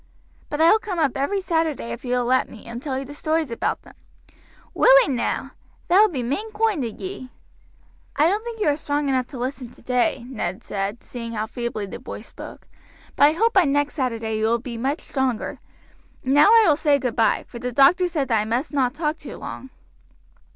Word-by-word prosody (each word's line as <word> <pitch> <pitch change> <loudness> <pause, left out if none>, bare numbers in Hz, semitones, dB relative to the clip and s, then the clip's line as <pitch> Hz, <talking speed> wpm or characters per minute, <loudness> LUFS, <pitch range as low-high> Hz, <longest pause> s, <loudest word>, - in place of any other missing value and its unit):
"But 295 - -3
I 325 +1 +6
will 440 - +5
come 410 -5 -5
up 295 -6 +1
every 385 +9 0
Saturday 320 -9 -1
if 235 +1 -7
you 250 -1 -1
will 245 -1 0
let 255 +1 +2
me, 225 - -13
and 235 +1 -7
tell 270 -2 -3
you 270 - -4
the 285 - -9
stories 310 -2 -1
all - - -2
about - - -2
them." - - -16 0.8
"Willee - - +6
now? 250 -3 -2 0.4
That 370 +4 +6
will 435 - +7
be 270 -8 -3
main 390 - -3
koinde 425 -8 +1
o' - - -1
ye." 375 -9 -6 0.9
"I 300 - +4
don't 410 +5 0
think 470 -1 -7
you 420 - +1
are 290 - +2
strong 290 -2 -1
enough 255 -2 +1
to 270 - -9
listen 250 0 -4
today," 250 +2 -1
Ned 235 -6 -4
said, 200 +2 -4
seeing 230 -2 -7
how 215 -1 -2
feebly 235 -2 -4
the 195 - -8
boy - - -8
spoke; - - -11 0.5
"but 285 - +6
I 300 - +5
hope 450 +7 +2
by 380 -3 +5
next 290 +1 +1
Saturday 230 -5 -2
you 215 - +1
will 230 +1 +2
be 235 0 -7
much 270 +7 -2
stronger. 260 -5 -2 0.7
And 265 - +1
now 290 +4 +7
I 450 0 +7
will 305 - +5
say 290 -2 +3
goodby, 240 -4 +1
for 235 - -9
the 250 +1 -3
doctor 285 - +5
said 310 -6 -2
that 225 -2 +3
I - - -3
must 245 +8 -2
not 260 -2 +1
talk 310 -1 -1
too - - -9
long." 265 - -8
275 Hz, 220 wpm, -23 LUFS, 240-325 Hz, 0.9 s, will